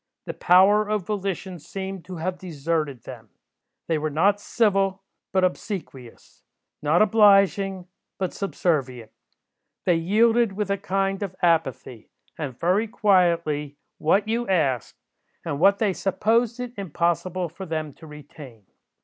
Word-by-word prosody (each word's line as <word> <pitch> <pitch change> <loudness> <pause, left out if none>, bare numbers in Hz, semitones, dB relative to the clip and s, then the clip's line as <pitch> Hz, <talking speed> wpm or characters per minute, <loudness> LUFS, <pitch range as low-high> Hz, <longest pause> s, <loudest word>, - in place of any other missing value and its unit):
The - - -5
power 205 +4 +4
of 210 -4 -1
volition 195 -3 -4
seemed 190 +3 -7
to 185 - -8
have 180 +2 -4
deserted 155 -6 -3
them. 115 -4 -11 0.6
They 160 -2 0
were 155 +1 -2
not 195 +7 +2
civil, 195 -3 +1 0.3
but 190 -1 +2
obsequious; 180 - -5 0.4
not 155 +6 +4
obliging, 195 -3 +3 0.3
but 185 -2 -3
subservient. 135 - -2 0.7
They 175 -2 +3
yielded 225 +5 +2
with 200 0 -2
a 200 - +1
kind 195 0 -1
of 195 -3 -4
apathy, 150 -8 0 0.3
and 140 -6 -6
very 190 +6 +1
quietly, 170 -9 +1 0.2
what 195 +7 +2
you 235 +2 -1
asked, 140 - 0 0.5
and 140 - -3
what 200 +4 +5
they 205 -3 +1
supposed 225 +6 0
it 250 -1 -5
impossible 175 0 -1
for 185 +4 -9
them 155 -3 -4
to 160 - -14
retain. 145 -7 -13
185 Hz, 130 wpm, -24 LUFS, 155-200 Hz, 0.7 s, what